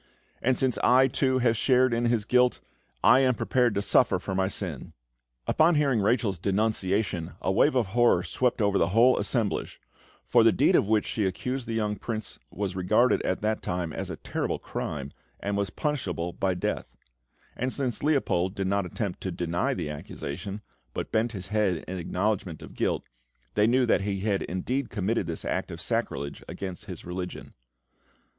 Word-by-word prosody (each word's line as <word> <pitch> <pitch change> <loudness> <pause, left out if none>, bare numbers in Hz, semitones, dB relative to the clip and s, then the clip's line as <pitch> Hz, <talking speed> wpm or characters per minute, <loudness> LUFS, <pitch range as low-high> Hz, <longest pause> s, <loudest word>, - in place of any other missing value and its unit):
"And, 130 +1 +2
since 130 -3 +1
I, 130 +2 +5
too, 130 0 +1
have 120 -2 +2
shared 130 +1 +3
in 120 +1 +1
his 115 -3 +1
guilt, 125 +1 +3 0.4
I 130 - +7
am 130 -2 +3
prepared 120 -1 +1
to 100 - 0
suffer - - +4
for - - -5
my 95 0 +1
sin!" 90 -7 -5 0.5
Upon 160 +2 +4
hearing 140 -7 +2
Rachel's 105 -3 +1
denunciation 100 -3 0
a 95 - 0
wave 130 +9 +3
of 125 -3 +3
horror 120 0 +4
swept 125 -3 0
over 100 -1 +2
the 85 - +3
whole 125 +2 +6
assemblage, 115 -6 0 0.5
for - - +4
the - - +6
deed - - +3
of - - +3
which 110 -1 +2
she 105 -4 -1
accused 125 +7 -3
the 115 - -2
young 105 -2 -1
Prince 110 0 -5
was 95 -1 -4
regarded 105 +7 +3
at 95 - -1
that 110 +1 0
time 90 -3 -3
as - - -4
a - - -4
terrible - - -3
crime, 70 -1 -5 0.3
and 100 0 -2
was 100 -1 0
punishable 90 - -2
by 95 -2 0
death; 90 - -2 0.7
and 130 +1 -2
since 130 -4 -2
Leopold 105 - +1
did 95 - -2
not 100 0 0
attempt 100 +1 -4
to 95 - -3
deny 85 0 -1
the 75 - -3
accusation, 90 +7 -6 0.3
but - - -4
bent 115 +2 +1
his 95 -2 -6
head 105 -6 0
in 95 0 -4
acknowledgment 90 -1 -2
of - - -11
guilt, - - -1 0.5
they 105 +1 +3
knew 125 +2 +3
that 115 - +3
he 100 -1 -2
had 100 -1 0
indeed 120 +9 -2
committed 105 -2 -1
this 85 -1 -5
act - - -2
of - - -7
sacrilege 70 +1 -3
against 95 +1 -6
his 90 -5 -8
religion. 90 +1 -6
105 Hz, 180 wpm, -27 LUFS, 95-120 Hz, 0.7 s, I